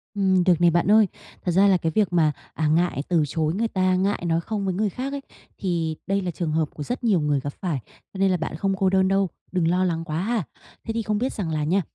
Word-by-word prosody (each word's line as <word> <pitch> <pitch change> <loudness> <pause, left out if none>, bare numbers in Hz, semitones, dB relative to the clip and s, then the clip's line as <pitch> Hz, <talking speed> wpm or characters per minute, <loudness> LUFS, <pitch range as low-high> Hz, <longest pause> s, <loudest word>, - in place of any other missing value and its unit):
Ừm, 190 -2 +3
được 175 -2 +3
này, 170 -1 +6
bạn 175 +4 +2
ơi. 215 -2 +6 0.4
Thật 175 - +1
ra 195 +3 +5
là 190 -2 +5
cái 165 -1 -1
việc 205 -5 +2
mà, 155 -3 +4 0.2
à, 155 -1 0
ngại 160 -2 +1
từ 165 -4 +3
chối 155 +2 -1
người 225 +4 0
ta, 185 -2 +1
ngại 195 0 0
nói 165 0 +1
không 205 +1 -3
với 190 - 0
người 205 +2 0
khác 265 +8 -5
ấy, 280 - -4 0.4
thì 165 -4 -1
đây 195 0 +1
là 180 -1 -2
trường 165 -2 -3
hợp 155 -1 0
của 150 - -6
rất 245 - -4
nhiều 205 -7 +3
người 145 -2 +1
gặp 145 +1 -5
phải, 165 -8 -1 0.3
cho - - -8
nên 195 -1 +3
là 180 - +2
bạn 160 -1 -4
không 195 +3 0
cô 190 -2 +2
đơn 190 0 +3
đâu, 195 -1 +2 0.2
đừng 180 -3 +1
lo 180 +2 +2
lắng 165 -2 -1
quá 155 +1 -2
ha. 220 -1 0 0.4
Thế 225 - -4
thì 230 - -1
không 210 -1 -1
biết 255 +4 -1
rằng 185 -6 -3
là 155 -1 -1
nha, 185 +6 +2
185 Hz, 275 wpm, -24 LUFS, 165-200 Hz, 0.4 s, này